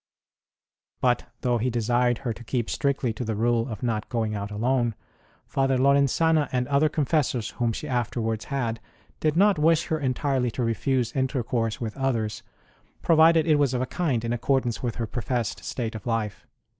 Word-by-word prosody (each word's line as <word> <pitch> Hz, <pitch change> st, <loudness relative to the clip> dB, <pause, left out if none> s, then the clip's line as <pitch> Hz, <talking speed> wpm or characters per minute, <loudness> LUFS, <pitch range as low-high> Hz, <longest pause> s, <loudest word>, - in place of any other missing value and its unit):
But, 125 Hz, -1 st, +1 dB, 0.2 s
though 120 Hz, -1 st, +1 dB
he 125 Hz, +3 st, 0 dB
desired 120 Hz, +1 st, +1 dB
her 120 Hz, -, 0 dB
to 120 Hz, -, -12 dB
keep 120 Hz, 0 st, -2 dB
strictly 140 Hz, -4 st, 0 dB
to 115 Hz, -, -5 dB
the 110 Hz, -2 st, -2 dB
rule 115 Hz, +2 st, +1 dB
of 110 Hz, -1 st, -6 dB
not 110 Hz, -3 st, -1 dB
going 110 Hz, -3 st, -1 dB
out 100 Hz, -1 st, -4 dB
alone, 120 Hz, +2 st, 0 dB, 0.5 s
Father 135 Hz, -1 st, +1 dB
Lorenzana, 140 Hz, +3 st, +3 dB
and 125 Hz, -1 st, 0 dB
other 145 Hz, +2 st, +3 dB
confessors 145 Hz, -6 st, 0 dB
whom 120 Hz, -1 st, -1 dB
she 150 Hz, -, -5 dB
afterwards 120 Hz, -3 st, -2 dB
had, 120 Hz, -5 st, -2 dB, 0.4 s
did 155 Hz, 0 st, +1 dB
not 200 Hz, -2 st, +4 dB
wish 165 Hz, +1 st, +3 dB
her 160 Hz, -, 0 dB
entirely 130 Hz, -2 st, 0 dB
to 120 Hz, +2 st, -3 dB
refuse 120 Hz, +1 st, 0 dB
intercourse 125 Hz, -4 st, -1 dB
with 110 Hz, -3 st, -4 dB
others, 115 Hz, -6 st, -1 dB, 0.6 s
provided 160 Hz, 0 st, +5 dB
it 155 Hz, -3 st, +3 dB
was 135 Hz, -3 st, +2 dB
of 125 Hz, -, 0 dB
a -, -, -1 dB
kind 130 Hz, -8 st, -1 dB
in 115 Hz, -, -1 dB
accord 130 Hz, +2 st, +1 dB
ance 120 Hz, -2 st, -3 dB
with 120 Hz, -3 st, -2 dB
her 115 Hz, -, -2 dB
professed 120 Hz, 0 st, -3 dB
state 115 Hz, -2 st, -3 dB
of 110 Hz, +1 st, -8 dB
life. 110 Hz, -3 st, -2 dB
125 Hz, 180 wpm, -25 LUFS, 115-140 Hz, 0.6 s, provided